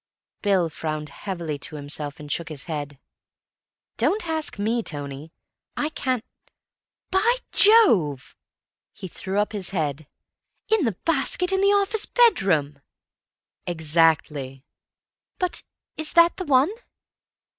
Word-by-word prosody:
Bill 195 -5 +2
frowned 155 -1 -4
heavily 170 -3 -5
to 155 - -4
himself, 145 0 -5
and 150 -1 -8
shook 170 +2 -2
his 150 -4 -6
head. 145 -4 -5 1.0
"Don't 420 -2 +1
ask 315 -6 -2
me, 225 +4 0
Tony. 145 -3 -6 0.5
I 300 - 0
can't—By 340 - -3 0.2
Jove!" 215 - +4 0.6
He 190 - -8
threw 190 +3 -5
up 210 +1 +1
his 200 -4 -4
head, 155 -5 -3 0.6
"In 435 -8 +3
the 215 -6 -1
basket 330 +4 +2
in 385 0 +1
the 395 - +4
office 405 +1 +1
bedroom!" 180 - +3 0.9
"Exactly." 155 -5 +1 0.7
"But 365 -1 -1 0.4
is 315 -1 -2
that 340 0 +5
the 370 - -4
one?" 280 +3 +4
190 Hz, 115 wpm, -24 LUFS, -, 1.0 s, that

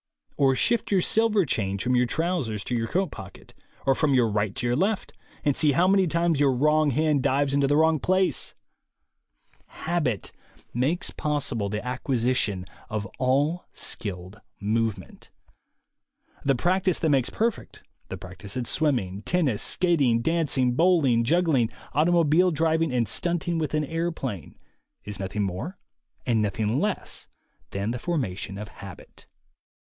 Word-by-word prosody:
Or 135 -1 +3
shift 235 - +1
your 190 -2 +4
silver 215 -1 +3
change 100 -7 -1
from 125 0 +1
your 125 0 +3
trousers 145 - -1
to - - -4
your 115 -1 0
coat 185 +8 -1
pocket, 95 -2 -11 0.3
or 135 - +4
from 140 0 +2
your 120 -3 +4
right 105 -1 -1
to - - -4
your 120 0 +1
left, 195 - -1 0.3
and 145 -2 +2
see 150 -3 +3
how 175 +6 +3
many 190 -1 +4
times 170 -2 +1
the 145 - +4
wrong 150 +4 +3
hand 150 +1 +1
dives 140 +1 +1
into 140 0 +3
the 145 +1 +2
wrong 160 0 +3
place! 185 +3 +1 1.1
Habit 150 - -2 0.4
makes 140 +9 0
possible 140 -9 -2
the 105 +3 -4
acquisition 125 -6 0 0.2
of 110 -2 -3
all 145 +7 +1
skilled 95 0 -3 0.2
movement. 110 -2 -2 1.1
The 135 -1 +2
practice 185 +6 +1
that 160 - 0
makes 135 -3 +2
perfect, 230 0 -3 0.3
the - - -5
practice 95 +4 -8
at 125 - -2
swimming, 115 - 0
tennis, 150 -7 0
skating, 140 -10 +2
dancing, 145 -6 +1
bowling, 145 -6 +3
juggling, 150 -4 +2 0.2
automobile 170 +2 +4
driving 160 0 +1
and 120 -3 +1
stunting 175 -1 -1
with 155 -1 -2
an 155 0 0
airplane, 160 - -4 0.5
is 105 -1 -6
nothing 100 +2 -2
more 100 - -4 0.5
and 115 -4 +2
nothing 105 +4 0
less 210 +3 -3 0.4
than 100 +3 -2
the 125 - -4
formation 105 - -3
of 105 +1 -6
habit. 95 -6 -12
135 Hz, 145 wpm, -25 LUFS, 110-165 Hz, 1.1 s, your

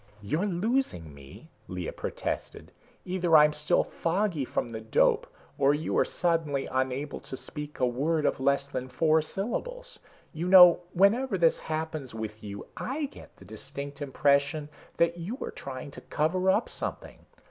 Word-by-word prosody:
"You're 155 - -1
losing 190 - -1
me," 70 -1 -14 0.2
Lea 90 -2 -4
protested. - - -5 0.3
"Either 180 -3 +4
I'm 150 0 +6
still 150 0 +2
foggy 170 -3 -1
from 120 - -2
the 110 -1 -6
dope, 110 0 +2 0.3
or 140 +1 +4
you 155 +2 -3
are - - +4
suddenly 165 -5 0
unable 130 +2 -2
to 130 - -8
speak 150 +2 -7
a 125 - +3
word 145 +6 0
of - - +1
less 140 +1 +2
than 130 -2 -4
four 160 +2 +3
syllables. - - -4 0.3
You 165 +2 -3
know 180 -2 +9
whenever 200 +5 +3
this 170 -2 +3
happens 155 -5 -4
with 110 -1 -6
you, 100 -1 -7
I 290 +4 -3
get - - -14
the 95 - -15
distinct 140 +7 -7
impression 140 +2 +1 0.3
that 170 +1 +2
you 200 +10 -4
are - - -4
trying 135 +1 -7
to - - -11
cover 185 +5 0
up - - +3
something. - - -5
150 Hz, 160 wpm, -28 LUFS, 130-175 Hz, 0.3 s, know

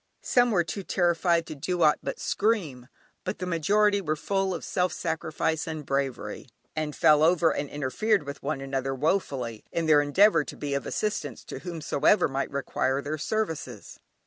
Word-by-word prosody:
Some 245 -1 +3
were 185 -6 +2
too 165 +4 -5
terrified 175 -2 +1
to - - -7
do 175 +4 -1
aught 150 -1 +4
but - - -5
scream, 170 - -1 0.4
but - - -3
the 180 - -4
majority 200 +5 +2
were 155 -4 -1
full 195 +4 -1
of 180 - -4
self 180 -1 0
sacrifice 160 0 -2
and 155 -2 -5
bravery, 135 -2 -3 0.3
and 155 -1 -2
fell 150 -1 +5
over, 165 0 +4
and 145 - -3
interfered 155 +8 0
with 140 0 -7
one 140 -1 -3
another 135 0 -2
woefully, 135 - -1
in 170 - -1
their 150 -2 +6
endeavour 165 +3 +4
to - - -9
be 145 -1 -3
of 140 - -2
assistance 210 0 -3
to - - -7
whomsoever 175 +2 +1
might 135 0 -2
require 135 -1 -1
their 150 +2 -4
services. 160 - -3
155 Hz, 170 wpm, -27 LUFS, 140-180 Hz, 0.4 s, their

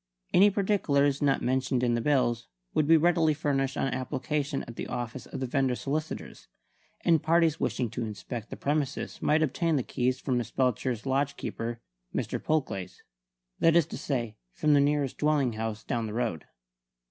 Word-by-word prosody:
Any 200 +3 +7
particulars 155 -9 +1
not 140 -2 +2
mentioned 130 0 +1
in 120 -1 +2
the 120 - +1
bills 120 -4 +1 0.3
would 150 - +2
be 165 +1 +7
readily 165 -1 +3
furnished 135 -2 0
on - - +1
application 135 +3 -2
at 120 - -9
the - - -5
office 120 +1 -5
of 135 - -6
the - - 0
vendor's 130 -1 0
solicitors; 155 +3 -4 0.5
and 165 -3 +3
parties 165 -1 +3
wishing 125 - 0
to 120 0 -3
inspect 110 +2 -6
the - - -7
premises 145 -1 -2
might 155 +1 +3
obtain 160 +3 +1
the 135 - +1
keys 125 +2 -1
from 130 -3 0
Miss 120 - -4
Belcher's 125 -2 0
lodge 140 +1 0
keeper, 115 +1 -4 0.3
Mr. - - -2
Polglaze 125 -12 -2 0.6
that 165 0 +4
is 170 -3 +5
to - - -7
say, 120 -6 -2 0.2
from 150 - +2
the 145 - +6
nearest 145 -2 0
dwelling 145 -5 +2
house 110 0 -4
down 115 -4 -2
the 105 - -6
road. 115 -10 -2
135 Hz, 175 wpm, -28 LUFS, 120-150 Hz, 0.6 s, Any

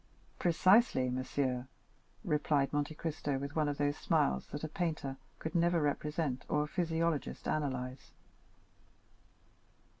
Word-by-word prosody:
"Precisely, 175 - +4
monsieur," 130 0 -1 0.6
replied 150 -5 +1
Monte 145 +1 -1
Cristo 150 -3 -2
with 140 +2 -5
one 155 -2 +2
of 145 - -2
those 145 0 +1
smiles 65 -1 +1
that 145 - -6
a - - -1
painter 155 -5 -2 0.2
could 160 - -5
never 170 0 +3
represent 150 -2 -1
or 150 0 +2
a - - -4
physiologist 165 -2 -1
analyze. 130 -3 -2
150 Hz, 120 wpm, -33 LUFS, 135-160 Hz, 0.6 s, Precisely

